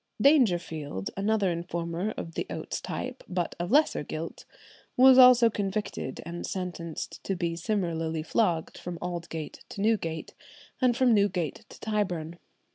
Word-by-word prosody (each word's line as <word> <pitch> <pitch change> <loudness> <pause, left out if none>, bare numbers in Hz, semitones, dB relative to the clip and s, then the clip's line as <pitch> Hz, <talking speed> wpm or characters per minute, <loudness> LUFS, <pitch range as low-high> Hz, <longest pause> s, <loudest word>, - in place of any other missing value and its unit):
"[124:1] - - -1
Dangerfield, 175 - +2
another 200 -1 +1
informer 170 +2 -3
of 165 - -6
the - - -3
Oates - - -4
type, 255 0 -5
but 180 -2 -1
of 175 +1 -2
lesser 300 +6 +4
guilt, - - -6 0.5
was 260 +1 +8
also 250 -2 +9
convicted 205 - -3
and 170 +1 -5
sentenced 170 -3 -5
to 195 - -1
be 170 -1 -1
similarly 165 -4 -1
flogged 170 -4 0
from 175 -1 -6
Aldgate 170 -3 -5
to - - -8
Newgate, 195 -7 0 0.5
and 245 -2 +3
from 255 -3 +4
Newgate 195 -7 0
to - - -13
Tyburn. 180 -6 -2
180 Hz, 140 wpm, -28 LUFS, 165-215 Hz, 0.5 s, also